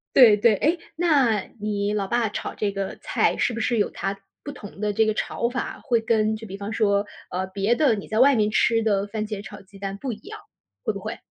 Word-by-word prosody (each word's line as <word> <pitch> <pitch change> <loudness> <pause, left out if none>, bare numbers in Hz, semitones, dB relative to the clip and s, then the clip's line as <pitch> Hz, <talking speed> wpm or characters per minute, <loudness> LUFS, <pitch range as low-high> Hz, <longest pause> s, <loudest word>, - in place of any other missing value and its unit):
对， 235 -5 +9
对， 210 +1 +4
诶， 320 - +1 0.2
那 280 -11 +3 0.2
你 205 -1 -1
老 200 -2 0
爸 235 +1 +1
炒 205 - -5
这 205 -2 -2
个 195 -1 -4
菜 - - +1
是 240 - +1
不 230 - -3
是 235 0 +1
有 205 - +2
他 195 0 -4 0.2
不 290 - -5
同 205 -6 -11
的 210 - +1
这 220 +2 +3
个 215 - +1
炒 235 - -1
法？ 260 - -4
会 235 -4 +2
跟 220 -1 +2
就 220 +1 -8
比 195 -1 -7
方 205 +2 -5
说， 205 -2 +2 0.2
呃， 185 +1 -2
别 195 +4 +1
的， 265 -5 +3
你 200 - -7
在 220 - 0
外 275 +2 +6
面 215 -2 +2
吃 225 +1 +3
的 205 -2 +1
番 215 +1 -3
茄 210 -2 -5
炒 205 - -10
鸡 195 +1 -17
蛋 195 0 -4
不 255 +4 -4
一 215 - -6
样， 430 - -10 0.4
会 - - +1
不 - - -6
会？ - - -6
215 Hz, 260 characters per minute, -24 LUFS, 200-235 Hz, 0.4 s, 对